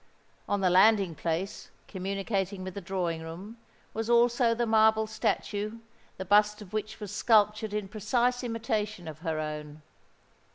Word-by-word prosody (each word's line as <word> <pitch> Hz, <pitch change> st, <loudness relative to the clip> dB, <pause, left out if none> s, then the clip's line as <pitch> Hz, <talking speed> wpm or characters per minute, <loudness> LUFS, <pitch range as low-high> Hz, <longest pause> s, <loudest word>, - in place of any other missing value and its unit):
On 200 Hz, -1 st, +1 dB
the 185 Hz, -2 st, +3 dB
landing 195 Hz, -1 st, +5 dB
place, 170 Hz, +5 st, -3 dB, 0.2 s
communicating 195 Hz, 0 st, -3 dB
with 185 Hz, 0 st, -6 dB
the 200 Hz, -, -6 dB
drawing 175 Hz, -3 st, -2 dB
room, 180 Hz, +8 st, -9 dB, 0.4 s
was 225 Hz, +1 st, -3 dB
also 235 Hz, 0 st, +4 dB
the 240 Hz, +1 st, 0 dB
marble 220 Hz, 0 st, +4 dB
statue, 215 Hz, 0 st, -2 dB, 0.4 s
the 190 Hz, -, -5 dB
bust 210 Hz, +2 st, +4 dB
of 210 Hz, -3 st, -12 dB
which 215 Hz, 0 st, -4 dB
was 210 Hz, -3 st, -6 dB
sculptured 215 Hz, -1 st, +3 dB
in 210 Hz, -1 st, -3 dB
precise 240 Hz, +5 st, 0 dB
imitation 220 Hz, -5 st, -2 dB
of 155 Hz, -1 st, -8 dB
her 160 Hz, -2 st, -2 dB
own. 150 Hz, 0 st, -6 dB
205 Hz, 150 wpm, -29 LUFS, 185-220 Hz, 0.4 s, landing